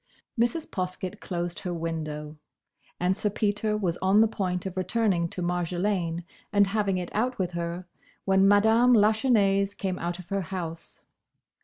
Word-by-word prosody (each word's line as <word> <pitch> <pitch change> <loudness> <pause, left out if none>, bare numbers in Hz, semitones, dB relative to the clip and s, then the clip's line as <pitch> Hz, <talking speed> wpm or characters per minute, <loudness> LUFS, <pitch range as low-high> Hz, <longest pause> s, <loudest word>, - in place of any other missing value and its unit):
Mrs. 240 +7 0
Poskett 185 +2 -4
closed 175 -2 -4
her 180 -1 -4
window, 155 -2 -4 0.6
and 180 +1 +2
Sir 210 +1 0
Peter 210 +1 0
was 180 -5 -1
on 190 +3 +3
the 225 - +6
point 185 -4 -2
of 190 -1 -4
returning 185 -2 +1
to 180 - -5
Marjolaine 175 0 -1 0.3
and 205 0 +5
having 200 -1 0
it 180 -1 -5
out 245 +4 0
with 180 -2 -1
her, 170 +1 -4 0.4
when 195 0 +4
Madame 220 +5 +5
Lachesnais 205 -3 +3
came 185 -2 -2
out 175 0 -3
of 180 -2 -12
her 195 0 0
house. 170 -2 -6
190 Hz, 155 wpm, -27 LUFS, 175-210 Hz, 0.6 s, the